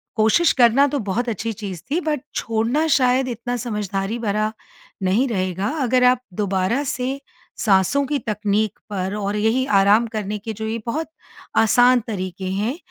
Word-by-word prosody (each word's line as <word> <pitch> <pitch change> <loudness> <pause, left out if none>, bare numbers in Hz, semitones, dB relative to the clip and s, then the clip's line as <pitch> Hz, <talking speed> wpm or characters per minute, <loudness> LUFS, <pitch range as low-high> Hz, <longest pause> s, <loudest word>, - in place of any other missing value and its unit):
कोशिश 220 +10 +4
करना 255 +3 +5
तो 285 0 -2
बहुत 225 +4 -2
अच्छी 225 +1 -3
चीज़ 195 -5 -7
थी 335 - +2
बट 300 -5 -1
छोड़ना 230 +8 0
शायद 255 0 +2
इतना 245 0 -3
समझदारी 210 -2 -3
भरा, 215 -1 0 0.5
नहीं 200 +9 +2
रहेगा। 185 -3 -1
अगर 250 0 +2
आप 250 0 +4
दोबारा 200 +6 0
से 265 0 -3 0.4
साँसों 200 +7 +2
की 295 - 0
तकनीक 210 -1 -1
पर 190 -1 -3
और 205 0 -2
यही 225 +5 +1
आराम 205 +4 +4
करने 210 -1 -3
के 220 +2 -6
जो 220 +1 -6
ये 225 +1 -2
बहुत 310 +8 -2 0.5
आसान 245 +3 +5
तरीके 185 -3 -4
हैं, 215 +9 -1
220 Hz, 160 wpm, -21 LUFS, 200-250 Hz, 0.5 s, करना